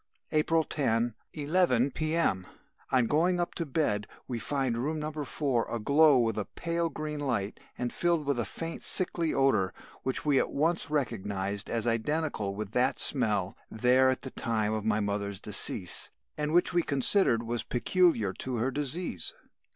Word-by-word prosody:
"April 160 +1 +2
10, 120 -6 0 0.2
11 145 -4 +2
P.M. 155 - 0 0.4
On 125 -2 +3
going 175 +7 +2
up 175 - -1
to 170 - -4
bed, 115 -8 0 0.2
we 120 -2 -3
find 135 0 -1
room 155 +5 -2
No. 155 +1 -3
4 145 -4 -1
aglow 140 +5 +4
with 115 -3 +1
a 105 - -2
pale 170 0 -2
green 155 -1 -5
light 120 -8 -2 0.2
and 125 -1 -3
filled 170 -3 +1
with 140 -3 0
a - - +1
faint 165 +10 -6
sickly 170 -3 +3
odour, 110 -9 +2 0.3
which 130 +3 0
we 145 -3 +4
at - - 0
once 160 +2 +1
recognised 100 -8 -2
as 115 -1 -1
identical 115 -3 -1
with 105 -1 -5
that 125 +3 +2
smelt 105 -8 +2
there 125 +3 +3
at 130 - -1
the 130 - -5
time 110 -2 -1
of 110 -1 -2
my 110 -1 +1
mother's 100 -1 -2
decease 95 -3 -2 0.3
and 150 0 -2
which 175 +2 +3
we 175 - +3
considered 140 - +2
was 120 0 -2
peculiar 120 - +2
to 130 +6 -4
her 120 +3 0
disease. 145 - -3
130 Hz, 165 wpm, -29 LUFS, 110-155 Hz, 0.4 s, aglow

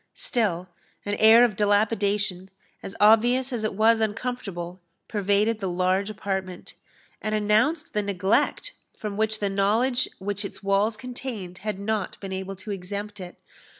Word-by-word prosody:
Still 185 -7 -1 0.4
an 205 - -1
air 225 +2 +8
of 220 -5 -2
dilapidation, 205 -2 +1 0.3
as 195 - -8
obvious 240 +5 +4
as 230 -3 -2
it 215 - -2
was 225 +2 +4
uncomfortable, 205 -6 -3 0.3
pervaded 205 +2 +1
the 195 -3 -2
large 185 +3 +1
apartment, 190 -3 -4 0.5
and 215 0 -1
announced 220 +10 +1
the 210 - +1
neglect 200 0 0 0.3
from 210 -2 -5
which 220 +1 0
the 205 - 0
knowledge 215 +6 +1
which 200 +1 -3
its 200 - -7
walls 200 +3 +2
contained 235 -7 -7
had 210 -2 -3
not 205 0 -2
been 195 -1 -6
able 190 +1 -4
to 205 +3 -8
exempt 200 +2 -5
it. 180 -1 -9
205 Hz, 150 wpm, -25 LUFS, 195-220 Hz, 0.5 s, air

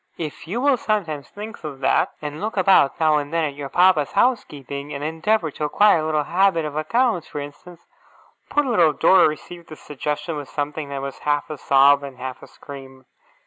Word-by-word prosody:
'If 160 0 -7
you 210 +8 -3
will 280 -1 +3
sometimes 165 - -2
think 210 -1 -9
of 145 -3 -7
that, 130 - +1
and 150 +2 -6
look 215 0 -4
about 185 -7 +4
now 155 -2 +3
and 145 0 -4
then 165 0 0
at 145 - -4
your 140 -1 -7
papa's 180 -2 +3
housekeeping, 145 - -1
and 140 - -5
endeavour 160 +3 0
to 150 - -4
acquire 205 +4 +4
a - - -2
little 155 -1 0
habit 175 0 +1
of 150 -1 -6
accounts, 180 +3 0
for 150 - -6
instance 145 +5 -11 0.3
' - - -33
Poor 295 - +2
little 175 - +3
Dora 185 -1 +5
received 170 +2 -8
this 155 - -11
suggestion 150 +2 -4
with 145 -2 -7
something 145 0 -4
that 140 -1 -5
was 140 -1 -6
half 145 +1 -1
a 155 - -5
sob 140 +1 +4
and 140 -2 -9
half 130 0 -7
a - - -12
scream. 135 -2 -12
155 Hz, 205 wpm, -22 LUFS, 145-180 Hz, 0.3 s, Dora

